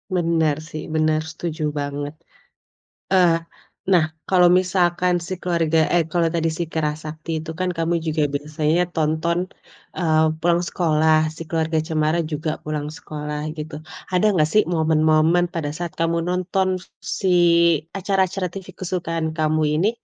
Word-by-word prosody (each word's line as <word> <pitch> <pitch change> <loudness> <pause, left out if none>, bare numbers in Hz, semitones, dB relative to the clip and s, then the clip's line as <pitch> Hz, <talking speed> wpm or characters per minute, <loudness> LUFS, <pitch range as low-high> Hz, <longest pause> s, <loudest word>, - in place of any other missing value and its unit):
Benar 165 -4 +2
sih, 155 -1 -7
benar, 155 0 +2
setuju 160 -1 -5 0.2
banget. 145 +1 -4 1.0
Eee, 175 -3 +5 0.5
nah, 180 -4 +4 0.2
kalau 180 -2 +5
misalkan 180 -1 +2
si 185 +1 -5
keluarga 165 -3 +1 0.2
eh 175 - +4
kalau 170 -1 +2
tadi 165 -1 +1
si 170 - -1
Kera 160 -1 -1
Sakti 155 +1 -8
itu 160 +1 -7
kan 185 +2 -1
kamu 165 0 -1
juga 155 -1 0
biasanya 155 +4 0
tonton, 160 +2 0 0.6
eee, 160 -3 +2 0.2
pulang 170 0 +3
sekolah 160 -2 +2
si 160 - -8
Keluarga 160 0 0
Cemara 155 0 +1
juga 155 +1 -2
pulang 150 -1 -3
sekolah 150 -1 -6
gitu. 155 -1 -6 0.3
Ada 180 +3 +2
nggak 155 -3 +3
sih 215 - +5
momen-momen 160 +1 +3
pada 155 -4 -2
saat 170 +2 -5
kamu 165 0 0
nonton 185 +1 0 0.3
si, 195 - -3 0.7
acara-acara 190 -1 0
TV 190 +1 -8
kesukaan 165 -3 -3
kamu 155 0 +2 0.2
ini, 195 +6 +3
165 Hz, 140 wpm, -22 LUFS, 155-175 Hz, 1.0 s, Eee